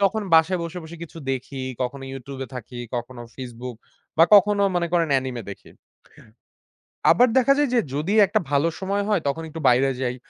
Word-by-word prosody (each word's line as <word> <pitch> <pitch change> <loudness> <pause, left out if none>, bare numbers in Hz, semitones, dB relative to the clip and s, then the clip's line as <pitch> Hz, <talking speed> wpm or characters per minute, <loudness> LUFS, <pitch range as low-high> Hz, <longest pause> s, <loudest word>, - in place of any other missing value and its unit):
তখন 205 +2 +1
বাসায় 165 +3 +4
বসে, 170 +2 -5
বসে 170 +2 -10
কিছু 165 - -12
দেখি। 135 +1 -4 0.2
কখনো 135 +2 -3
YouTube 135 0 -8
এ - - -10
থাকি, 125 0 -8 0.2
কখনো 120 0 -5 0.2
Facebook 125 -1 -7 0.4
বা, - - +8
কখনো 205 0 +5
মনে 175 -1 +1
করেন 170 -2 +2
anime 130 -2 -5
দেখি। 100 - -11 1.4
আবার 245 +10 +5
দেখা 270 +2 +5
যায় 290 - +3
যে 240 - +4 0.2
যদি 160 +8 -1
একটা - - +1
ভালো 145 +3 +2
সময় 200 +1 -1
হয়, 205 - +3
তখন 160 +4 -2
একটু 165 +1 -8
বাইরে 130 +2 +3
যাই, 125 -1 -1
155 Hz, 180 wpm, -23 LUFS, 130-185 Hz, 1.4 s, বা